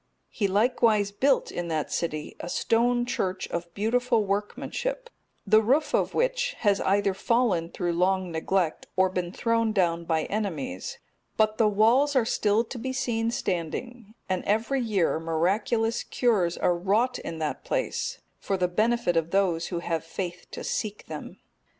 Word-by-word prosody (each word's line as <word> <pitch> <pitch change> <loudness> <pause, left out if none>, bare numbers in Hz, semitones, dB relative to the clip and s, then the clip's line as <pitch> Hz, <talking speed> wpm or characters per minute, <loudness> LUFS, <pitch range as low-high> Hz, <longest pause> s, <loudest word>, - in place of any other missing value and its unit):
He 205 - 0
likewise 215 0 +2
built, 265 +6 +2
in 175 -1 -4
that 160 -2 -2
city, 155 -3 -3
a 175 - -6
stone 240 +5 +2
church 195 -7 -2
of 170 0 -4
beautiful 230 +1 +1
workmanship; 480 - -3 0.3
the 215 0 +5
roof 270 +8 +2
of - - +1
which - - +1
has 205 -3 +3
either 200 0 +2
fallen 200 -6 +1
through 175 -1 -2
long 185 +1 +1
neglect, 165 +1 -1
or 190 0 +4
been 180 -2 -2
thrown 230 +1 +1
down 170 -4 +1
by 160 -1 +1
enemies, 165 - -3 0.4
but 215 0 +2
the 220 - +5
walls 235 +8 +3
are 250 -4 +4
still 215 0 +2
to 240 +1 -8
be 260 +3 -3
seen 230 -3 0
standing, 215 +4 -4
and 185 -1 -1
every 230 +6 +1
year 200 -9 +1
miraculous 195 +8 0
cures 200 -9 +1
are 175 - +2
wrought 210 +8 +1
in 165 - -6
that 155 -2 -3
place, - - -2 0.2
for 195 - -1
the 180 -1 +1
benefit 215 +1 +1
of 165 0 +1
those 175 -3 +1
who 175 -2 -3
have 165 -2 -2
faith 175 +1 -6
to - - -7
seek 210 -1 -3
them. - - -8
205 Hz, 160 wpm, -27 LUFS, 175-235 Hz, 0.4 s, the